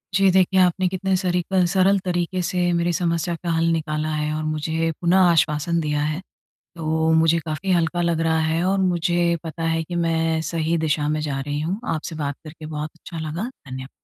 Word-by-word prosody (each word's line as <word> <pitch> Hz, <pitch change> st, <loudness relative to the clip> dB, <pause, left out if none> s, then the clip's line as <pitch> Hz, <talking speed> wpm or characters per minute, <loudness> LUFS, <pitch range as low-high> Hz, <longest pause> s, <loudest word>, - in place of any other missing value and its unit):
जी, 195 Hz, +1 st, +5 dB
देखिए 190 Hz, +1 st, +3 dB
आपने 185 Hz, 0 st, +3 dB
कितने 190 Hz, +1 st, 0 dB
सरीकल 180 Hz, 0 st, +1 dB
सरल 195 Hz, +1 st, +4 dB
तरीके 180 Hz, 0 st, -1 dB
से 180 Hz, 0 st, 0 dB
मेरी 170 Hz, 0 st, +1 dB
समस्या 170 Hz, -1 st, 0 dB
का 175 Hz, -, -2 dB
हल 165 Hz, 0 st, +1 dB
निकाला 155 Hz, -1 st, -1 dB
है 150 Hz, 0 st, -1 dB
और 155 Hz, -, -3 dB
मुझे 160 Hz, +1 st, -1 dB
पुनः 175 Hz, +2 st, +3 dB
आश्वासन 160 Hz, +2 st, +1 dB
दिया 150 Hz, -2 st, -1 dB
है, 155 Hz, +3 st, -2 dB, 0.6 s
तो 160 Hz, 0 st, +1 dB
मुझे 160 Hz, +1 st, +4 dB
काफ़ी 160 Hz, +4 st, -3 dB
हल्का 175 Hz, 0 st, +1 dB
लग 170 Hz, -1 st, +1 dB
रहा 160 Hz, 0 st, +2 dB
है 160 Hz, +1 st, +1 dB
और 195 Hz, +1 st, +2 dB
मुझे 175 Hz, -1 st, +1 dB
पता 165 Hz, 0 st, -6 dB
है 165 Hz, 0 st, 0 dB
कि 175 Hz, -, -7 dB
मैं 165 Hz, -1 st, +1 dB
सही 165 Hz, 0 st, 0 dB
दिशा 150 Hz, -2 st, 0 dB
में 155 Hz, 0 st, 0 dB
जा 145 Hz, -3 st, -2 dB
रही 145 Hz, +2 st, -3 dB
हूँ। 180 Hz, +7 st, -2 dB
आपसे 160 Hz, +1 st, -5 dB
बात 145 Hz, -2 st, -2 dB
करके 155 Hz, 0 st, -10 dB
बहुत 155 Hz, 0 st, -4 dB
अच्छा 165 Hz, 0 st, -9 dB
लगा। 180 Hz, +11 st, -4 dB, 0.2 s
धन्य 130 Hz, +1 st, -7 dB
165 Hz, 195 wpm, -22 LUFS, 155-175 Hz, 0.6 s, जी